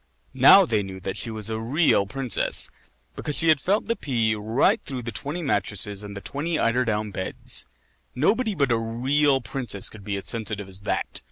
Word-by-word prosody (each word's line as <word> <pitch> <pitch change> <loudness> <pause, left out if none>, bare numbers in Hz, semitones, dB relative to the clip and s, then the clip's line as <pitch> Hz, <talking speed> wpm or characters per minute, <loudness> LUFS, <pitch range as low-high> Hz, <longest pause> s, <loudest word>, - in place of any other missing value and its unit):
Now 140 +9 +7
they 110 -9 0
knew 95 -1 -7
that 95 0 -4
she 115 - -2
was 110 -1 -1
a 110 - -2
real 120 - +2
princess 125 +1 +1 0.4
because 145 - -3
she 165 - +3
had 155 -2 +5
felt 200 +8 0
the 230 - 0
pea 115 - 0
right 110 +4 +1
through 130 -3 -6
the 120 - -5
twenty 145 - -4
mattresses 105 - -1
and 100 -1 -8
the - - -7
twenty 155 +7 -3
eider 120 0 +1
down 105 -2 -2
beds. 95 -1 -3 0.5
Nobody 215 - +1
but 140 -6 +1
a 115 - +2
real 135 +5 +1
princess 115 -4 -1
could 105 -2 -13
be 100 0 -3
as 100 - -7
sensitive 110 -3 0
as 95 +1 -6
that. - - -2
115 Hz, 195 wpm, -24 LUFS, 105-145 Hz, 0.5 s, Now